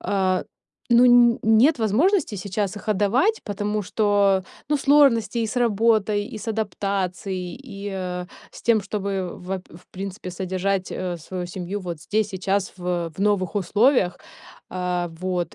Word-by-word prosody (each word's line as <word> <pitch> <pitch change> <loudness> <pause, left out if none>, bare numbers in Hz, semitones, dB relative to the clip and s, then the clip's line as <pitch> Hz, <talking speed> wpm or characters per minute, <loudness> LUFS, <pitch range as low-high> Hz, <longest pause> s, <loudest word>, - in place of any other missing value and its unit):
а, 190 -2 0 0.5
ну, 235 +1 +7
нь 240 -1 +6
нет 235 +7 +4
возможности 255 - +2
сейчас 200 +1 -3
их 210 - -9
отдавать. 215 - +2
Потому 205 0 -2
что, 200 -1 +2 0.3
ну, 300 - +2
сложности 270 -6 +4
и 225 - +1
с 220 - -6
работой, 215 -3 +2
и - - -5
с 215 - -7
адаптацией, 195 -4 -2
и, 200 -4 -7
э, 180 -1 -4 0.2
с - - -13
тем, 225 -2 +3
чтобы 195 -3 -3
ва 185 +1 -4
в 170 +3 -15
принципе 190 0 -6
содержать, 185 +1 -2
э, 180 -1 -3
свою 180 +2 -6
семью 185 +3 -5
вот 175 -4 -6
здесь, 215 0 0
сейчас 195 0 -1
в, 180 - -7
э, 175 -2 -1
в 160 - -11
новых 200 -2 +1
условиях, 205 +1 +2 0.5
а, 180 -1 -2
вот 180 -2 -2
200 Hz, 155 wpm, -23 LUFS, 185-220 Hz, 0.5 s, ну